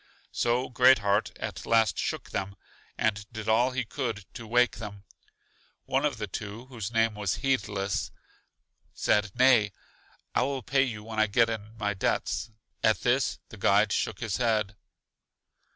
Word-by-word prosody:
So 120 Hz, +2 st, +1 dB
Great 125 Hz, +2 st, +6 dB
heart 100 Hz, -1 st, +1 dB
at -, -, -5 dB
last 110 Hz, -6 st, +3 dB
shook -, -, -3 dB
them, 100 Hz, 0 st, -3 dB, 0.4 s
and 110 Hz, -3 st, 0 dB
did 110 Hz, -1 st, -7 dB
all 115 Hz, +3 st, +4 dB
he 130 Hz, -1 st, -2 dB
could 115 Hz, -5 st, -4 dB
to 115 Hz, -, -8 dB
wake 120 Hz, 0 st, +3 dB
them. 100 Hz, -2 st, -8 dB, 0.8 s
One 135 Hz, +2 st, +1 dB
of 145 Hz, -, 0 dB
the 110 Hz, -, -3 dB
two, 105 Hz, +4 st, -7 dB
whose 115 Hz, -6 st, -6 dB
name 115 Hz, -1 st, +2 dB
was 100 Hz, -4 st, -1 dB
Heedless, 105 Hz, -7 st, 0 dB, 0.9 s
said, 105 Hz, 0 st, +2 dB
Nay: 120 Hz, -5 st, +5 dB, 0.6 s
I -, -, +2 dB
will 135 Hz, 0 st, -1 dB
pay 135 Hz, +4 st, +2 dB
you 115 Hz, -6 st, -2 dB
when 110 Hz, 0 st, -5 dB
I 110 Hz, -, +4 dB
get 115 Hz, +3 st, +3 dB
in 110 Hz, 0 st, -7 dB
my 105 Hz, -2 st, -1 dB
debts. 95 Hz, -, -1 dB, 0.3 s
At 110 Hz, -, +3 dB
this 130 Hz, +2 st, +1 dB
the 115 Hz, -, -11 dB
guide 100 Hz, +2 st, +3 dB
shook 110 Hz, 0 st, -1 dB
his 115 Hz, -5 st, -1 dB
head. 110 Hz, -4 st, +1 dB
110 Hz, 160 wpm, -28 LUFS, 105-120 Hz, 0.9 s, Great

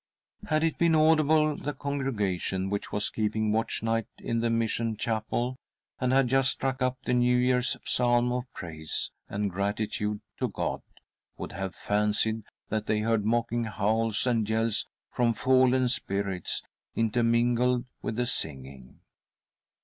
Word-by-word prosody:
Had 155 Hz, 0 st, +2 dB
it 165 Hz, -1 st, 0 dB
been 170 Hz, -1 st, +4 dB
audible, 155 Hz, -1 st, +4 dB
the 145 Hz, 0 st, -4 dB
congregation 100 Hz, -9 st, -2 dB
which 100 Hz, -, -3 dB
was 105 Hz, 0 st, 0 dB
' -, -, -20 dB
keeping 110 Hz, 0 st, 0 dB
watch 110 Hz, +1 st, -1 dB
night 115 Hz, -1 st, 0 dB
in 115 Hz, -, -2 dB
the 115 Hz, 0 st, +1 dB
mission 115 Hz, -1 st, 0 dB
chapel, 115 Hz, +3 st, -1 dB, 0.4 s
and 125 Hz, -1 st, +1 dB
had 135 Hz, -1 st, +4 dB
just 135 Hz, +1 st, +3 dB
struck 130 Hz, -1 st, -2 dB
up 130 Hz, 0 st, +1 dB
the 125 Hz, -, 0 dB
New 125 Hz, 0 st, +4 dB
Year's 125 Hz, 0 st, +2 dB
psalm 120 Hz, 0 st, +2 dB
of 125 Hz, +1 st, -3 dB
praise 80 Hz, -2 st, -4 dB, 0.2 s
and 100 Hz, 0 st, -1 dB
gratitude 105 Hz, +2 st, -2 dB, 0.2 s
to -, -, +1 dB
God, -, -, -3 dB, 0.6 s
would -, -, -6 dB
have 95 Hz, -1 st, -4 dB
fancied 105 Hz, +1 st, 0 dB, 0.2 s
that 110 Hz, 0 st, -2 dB
they 105 Hz, 0 st, +1 dB
heard 115 Hz, -1 st, +1 dB
mocking 120 Hz, +1 st, +1 dB
howls 110 Hz, +1 st, +1 dB
and 115 Hz, -4 st, +1 dB
yells 110 Hz, 0 st, 0 dB, 0.2 s
from 120 Hz, -1 st, +2 dB
fallen 130 Hz, +1 st, +3 dB
spirits, 100 Hz, -6 st, -2 dB, 0.3 s
intermingled 120 Hz, +2 st, +2 dB, 0.2 s
with 110 Hz, -, -3 dB
the 125 Hz, +1 st, 0 dB
singing. 65 Hz, -, -4 dB
115 Hz, 145 wpm, -28 LUFS, 105-125 Hz, 0.6 s, been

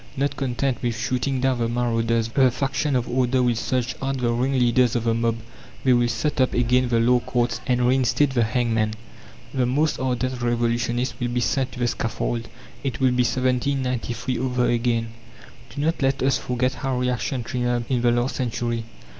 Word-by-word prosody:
Not 140 Hz, +1 st, 0 dB
content 130 Hz, 0 st, -1 dB
with 120 Hz, -3 st, -1 dB
shooting 130 Hz, +3 st, -1 dB
down 130 Hz, -2 st, +1 dB
the 115 Hz, -1 st, 0 dB
"marauders," 115 Hz, -1 st, 0 dB
the 130 Hz, +2 st, +4 dB
faction 135 Hz, +3 st, -1 dB
of 125 Hz, -1 st, 0 dB
"order" 125 Hz, 0 st, +1 dB
will 120 Hz, -1 st, +3 dB
search 125 Hz, +2 st, -1 dB
out 135 Hz, 0 st, -1 dB
the 120 Hz, -2 st, 0 dB
"ringleaders 125 Hz, -1 st, +2 dB
of 120 Hz, -, 0 dB
the 115 Hz, -1 st, +2 dB
mob." 115 Hz, 0 st, 0 dB, 0.5 s
They 130 Hz, -, +4 dB
will 120 Hz, 0 st, +3 dB
set 145 Hz, +3 st, -1 dB
up 130 Hz, -, +2 dB
again 125 Hz, +1 st, +2 dB
the 115 Hz, -1 st, +2 dB
law 125 Hz, +2 st, +4 dB
courts 120 Hz, 0 st, -1 dB
and 125 Hz, -1 st, +2 dB
reinstate 130 Hz, +2 st, +2 dB
the 120 Hz, -3 st, +2 dB
hangman. 110 Hz, -2 st, 0 dB, 0.6 s
The 130 Hz, -2 st, +1 dB
most 145 Hz, +5 st, +1 dB
ardent 130 Hz, -1 st, -1 dB
revolutionists 120 Hz, +1 st, 0 dB
will 120 Hz, -, -1 dB
be 120 Hz, 0 st, -1 dB
sent 130 Hz, +2 st, 0 dB
to 125 Hz, -, -8 dB
the 120 Hz, -, +1 dB
scaffold. 115 Hz, 0 st, -2 dB, 0.4 s
It 130 Hz, -4 st, -3 dB
will 130 Hz, -1 st, +3 dB
be 125 Hz, 0 st, +2 dB
1793 125 Hz, -1 st, -1 dB
over 125 Hz, -1 st, 0 dB
again. 115 Hz, -1 st, 0 dB, 0.6 s
Do 145 Hz, -, -5 dB
not 165 Hz, -1 st, 0 dB
let 135 Hz, 0 st, +1 dB
us 135 Hz, +1 st, +2 dB
forget 125 Hz, +1 st, -1 dB
how 135 Hz, -3 st, -2 dB
reaction 125 Hz, 0 st, -1 dB
triumphed 120 Hz, 0 st, -2 dB
in 125 Hz, -2 st, +2 dB
the 120 Hz, -, +3 dB
last 120 Hz, +2 st, 0 dB
century. 120 Hz, -2 st, -2 dB
125 Hz, 185 wpm, -23 LUFS, 120-130 Hz, 0.6 s, the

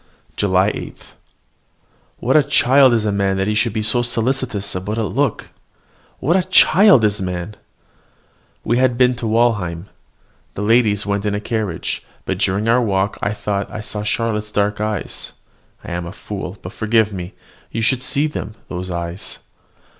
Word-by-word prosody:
JULY 95 Hz, 0 st, +2 dB
8. -, -, -7 dB, 1.2 s
What 130 Hz, -, 0 dB
a 155 Hz, -, +8 dB
child 135 Hz, -1 st, +5 dB
is 115 Hz, -2 st, +1 dB
man 100 Hz, -2 st, +1 dB
that 95 Hz, -, 0 dB
he 105 Hz, -, +1 dB
should 110 Hz, +2 st, +1 dB
be 110 Hz, +1 st, -2 dB
so 120 Hz, +3 st, +3 dB
solicitous 120 Hz, -3 st, -1 dB
about 100 Hz, +4 st, -3 dB
a 115 Hz, -, 0 dB
look! 135 Hz, +3 st, -1 dB, 0.7 s
What 165 Hz, +6 st, +1 dB
a 190 Hz, -, +4 dB
child 185 Hz, -, +6 dB
is 105 Hz, -1 st, +1 dB
man! 90 Hz, +2 st, -4 dB, 1.1 s
We 120 Hz, +2 st, +1 dB
had 130 Hz, -2 st, +2 dB
been 125 Hz, 0 st, +4 dB
to 115 Hz, -, -3 dB
Walheim: 105 Hz, -6 st, 0 dB, 0.7 s
the 100 Hz, -, -3 dB
ladies 105 Hz, -2 st, +3 dB
went 100 Hz, -1 st, -1 dB
in 105 Hz, -, 0 dB
a -, -, -1 dB
carriage; 105 Hz, -5 st, -3 dB, 0.2 s
but -, -, -2 dB
during 100 Hz, +4 st, +1 dB
our 120 Hz, +2 st, +4 dB
walk 100 Hz, -3 st, 0 dB
I 100 Hz, -, 0 dB
thought 100 Hz, -2 st, -3 dB
I 110 Hz, -, -6 dB
saw 105 Hz, 0 st, -6 dB
in 105 Hz, -, -4 dB
Charlotte's 105 Hz, -1 st, -1 dB
dark 105 Hz, +1 st, 0 dB
eyes 105 Hz, -3 st, -4 dB, 0.5 s
I -, -, -8 dB
am 85 Hz, 0 st, -3 dB
a -, -, -6 dB
fool 100 Hz, -2 st, -6 dB
but 90 Hz, -, -7 dB
forgive 110 Hz, -2 st, +1 dB
me! 90 Hz, -1 st, -6 dB, 0.3 s
you 115 Hz, -, -3 dB
should 125 Hz, +3 st, +2 dB
see 140 Hz, +3 st, 0 dB
them, 150 Hz, -7 st, -5 dB
those 90 Hz, +1 st, -5 dB
eyes. 85 Hz, +1 st, -5 dB
105 Hz, 170 wpm, -19 LUFS, 100-120 Hz, 1.2 s, a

